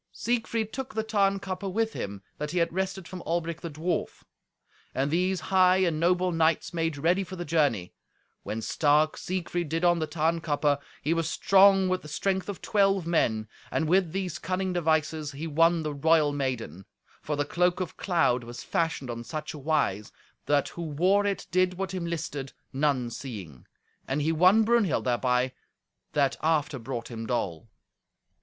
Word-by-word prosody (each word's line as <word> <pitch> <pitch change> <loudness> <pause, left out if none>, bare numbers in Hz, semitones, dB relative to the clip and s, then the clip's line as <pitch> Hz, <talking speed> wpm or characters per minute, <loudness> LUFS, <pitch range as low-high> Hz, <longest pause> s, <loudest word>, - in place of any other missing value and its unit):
Siegfried 230 -2 -1
took 265 0 -5
the 220 - 0
Tarnkappe 195 -2 0
with 225 +3 0
him 100 0 -5 0.2
that 150 0 -3
he 180 - -3
had 170 -1 +1
wrested 190 -1 -2
from 185 -1 -7
Albric 170 0 -2
the 170 - -5
dwarf. 160 +4 -3 0.7
And 135 +2 0
these 180 +2 +1
high 185 0 +6
and 170 -5 +1
noble 180 +2 +2
knights 165 0 +1
made 165 -3 -1
ready 175 +6 +2
for 185 0 -8
the 175 -1 -5
journey. 145 - +1 0.5
When 110 +1 -4
stark 150 +4 +2
Siegfried 175 -2 -3
did 165 +3 0
on 175 -1 +4
the 155 - -1
Tarnkappe, 155 -3 0 0.2
he 155 - +2
was 165 -1 -1
strong 195 +1 +5
with 185 0 0
the - - -11
strength 190 +6 -1
of 200 - -6
twelve 195 -3 +2
men, 110 -10 +1 0.2
and 160 - 0
with 180 0 +3
these 185 -2 -3
cunning 185 0 -2
devices 155 -3 0
he 145 +4 -5
won 165 +1 +3
the 150 -1 -2
royal 150 0 +3
maiden; 120 - -3 0.3
for 150 - -2
the 145 0 0
cloak 180 +4 +1
of 185 -3 -4
cloud 165 -10 +1
was 120 +1 -8
fashioned 160 -6 -1
on 115 0 -6
such 150 +6 -5
wise, 140 -9 -1 0.4
that 145 -1 +2
who 170 - -8
wore 180 +6 +2
it 200 - -2
did 185 0 +2
what 190 +1 -4
him 180 -2 -3
listed, 150 -5 -4 0.2
none 135 -4 +1
seeing; 100 - -8 0.4
and 140 +2 -1
he 160 - +2
won 185 +7 +5
Brunhild 225 -6 +2
thereby, 125 +1 +1 0.6
that 140 -2 +2
after 155 -4 +1
brought 120 0 -5
him 115 -1 -5
dole. 110 -4 -2
165 Hz, 170 wpm, -27 LUFS, 145-185 Hz, 0.7 s, high